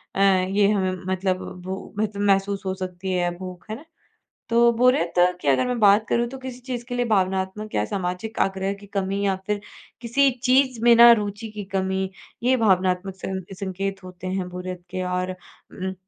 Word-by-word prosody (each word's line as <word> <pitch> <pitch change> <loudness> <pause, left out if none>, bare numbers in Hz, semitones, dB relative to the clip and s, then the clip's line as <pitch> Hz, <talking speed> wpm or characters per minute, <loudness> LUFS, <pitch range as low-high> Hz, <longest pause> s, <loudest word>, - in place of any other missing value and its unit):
अ, - - -2
ये 195 +1 +3
हमें 190 -2 0 0.2
मतलब 185 0 -1 0.2
भू 190 +1 -6
मतलब 205 -1 -1
महसूस 195 0 +1
हो 190 - -1
सकती 185 0 -5
है 175 -1 +1
भूख, 185 +2 -9
है 215 - -3
ना। 300 - -12 0.6
तो 235 +1 +5
बोरियत 250 -9 +3 0.3
की 145 - -5
अगर 135 - +3
मैं 250 -1 -1
बात 210 +1 +5
करूँ, 235 0 +1
तो 265 - -8
किसी 260 -1 -8
चीज़ 245 -1 -5
के 245 0 -5
लिए 245 0 +1
भावनात्मक 190 0 -1
या 105 - +2
सामाजिक 185 - -4
आग्रह 195 0 -2
की 205 - -13
कमी 195 0 -2
या 195 -1 +2
फिर 205 -1 -1 0.4
किसी 270 +4 +3
चीज़ 260 -2 +3
में 240 0 +7
ना 235 0 +9
रुचि 205 +2 -5
की 210 -1 -6
कमी, 190 0 -1 0.3
ये 260 +1 +4
भावनात्मक 190 -3 +1
सं 190 0 -4 0.2
संकेत 195 0 -4
होते 185 0 -9
हैं 185 -1 -2
बोरियत 180 0 -6
के। 185 0 -3
और 180 0 -1
उम, 185 +1 -8
195 Hz, 185 wpm, -24 LUFS, 185-220 Hz, 0.6 s, ना